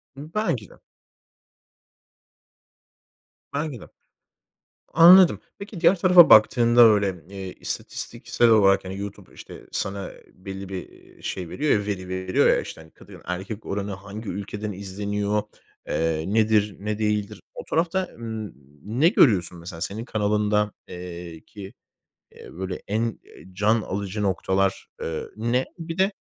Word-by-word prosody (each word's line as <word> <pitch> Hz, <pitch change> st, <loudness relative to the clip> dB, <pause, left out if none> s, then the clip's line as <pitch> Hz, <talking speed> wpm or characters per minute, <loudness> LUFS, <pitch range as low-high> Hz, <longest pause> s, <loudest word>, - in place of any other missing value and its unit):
Hıı, 150 Hz, +4 st, -10 dB
belki 125 Hz, -, -1 dB
de. -, -, -16 dB, 2.8 s
Belki 145 Hz, -3 st, -3 dB
de. -, -, -12 dB, 1.1 s
Anladım. 175 Hz, +2 st, +8 dB, 0.2 s
Peki, 200 Hz, -3 st, -8 dB
diğer 180 Hz, +1 st, +4 dB
tarafa 180 Hz, -2 st, +7 dB
baktığında 120 Hz, +2 st, +6 dB
öyle, 100 Hz, -6 st, +3 dB
iii, 95 Hz, -2 st, -7 dB
istatistiksel 120 Hz, -1 st, -2 dB
olarak, 100 Hz, -3 st, +4 dB
hani, 95 Hz, +1 st, -6 dB
YouTube, 100 Hz, -1 st, -8 dB
işte, -, -, -12 dB
ııı, -, -, -17 dB
sana, 100 Hz, 0 st, -3 dB
ııı, -, -, -11 dB
belli 95 Hz, +1 st, -8 dB
bir, 95 Hz, -2 st, -9 dB
ııı, -, -, -21 dB
şey 90 Hz, -3 st, -4 dB
veriyor 150 Hz, -, -1 dB
ya, 105 Hz, -, -5 dB
veri 95 Hz, -3 st, -4 dB
veriyor 95 Hz, 0 st, +1 dB
ya, -, -, +5 dB
hani, -, -, +1 dB
işte, 80 Hz, 0 st, -11 dB
kadın-erkek 95 Hz, +5 st, -7 dB
oranı, 100 Hz, 0 st, -3 dB
hangi 100 Hz, +3 st, -8 dB
ülkeden 105 Hz, +2 st, -5 dB
izleniyor, 100 Hz, +2 st, -2 dB, 0.4 s
eee, 80 Hz, -1 st, -1 dB
nedir, 105 Hz, -2 st, +2 dB
ne 105 Hz, +1 st, -3 dB
değildir? 105 Hz, -1 st, -1 dB
O -, -, -8 dB
tarafta, 175 Hz, +3 st, 0 dB
ımm, 110 Hz, -2 st, -6 dB, 0.5 s
ne 160 Hz, +4 st, +6 dB
görüyorsun 100 Hz, -, +3 dB
mesela 85 Hz, 0 st, -9 dB
senin 105 Hz, +5 st, -4 dB
kanalında, 105 Hz, -1 st, +1 dB, 0.2 s
eee, 85 Hz, -2 st, -8 dB
ki, 100 Hz, -2 st, -10 dB, 0.6 s
eee, -, -, -13 dB
böyle 90 Hz, +1 st, -5 dB
en, 115 Hz, +2 st, -1 dB
eee, -, -, -17 dB
can 110 Hz, +4 st, +2 dB
alıcı 100 Hz, +1 st, -4 dB
noktalar, 95 Hz, 0 st, 0 dB
ııı, 80 Hz, -1 st, -4 dB
ne? 120 Hz, +4 st, 0 dB
Bir 165 Hz, +1 st, -6 dB
de, 190 Hz, +2 st, +3 dB
105 Hz, 140 wpm, -24 LUFS, 95-115 Hz, 2.8 s, Anladım